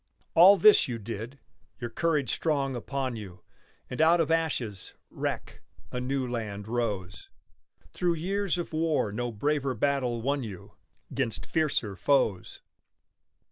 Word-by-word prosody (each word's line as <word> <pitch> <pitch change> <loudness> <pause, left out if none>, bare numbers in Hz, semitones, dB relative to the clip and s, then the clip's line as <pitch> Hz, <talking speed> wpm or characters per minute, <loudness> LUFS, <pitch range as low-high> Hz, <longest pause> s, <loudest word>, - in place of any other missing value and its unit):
All 190 +5 +8
this 215 +2 +6
you 120 -3 -3
did, 115 +4 -6 0.4
your 120 -1 -5
courage 150 -2 0
strong 140 -4 0
upon 130 +1 -3
you, 95 -5 -9 0.4
And 125 - -3
out 165 +2 +5
of 160 -1 +1
ashes, 130 - -1 0.2
wreck, - - -4 0.3
a 125 - -3
new 130 0 -1
land 105 -4 -4
rose, 105 -5 -3 0.6
Through 175 -1 +1
years 190 +2 -1
of 175 -2 -5
war 155 -9 +1
no 120 +3 -3
braver 140 +3 0
battle 125 -1 0
won 140 +2 0
you, 100 -7 -8 0.4
'Gainst 115 -5 -2
fiercer 145 - 0
foes. 110 -5 0
130 Hz, 135 wpm, -28 LUFS, 110-155 Hz, 0.6 s, All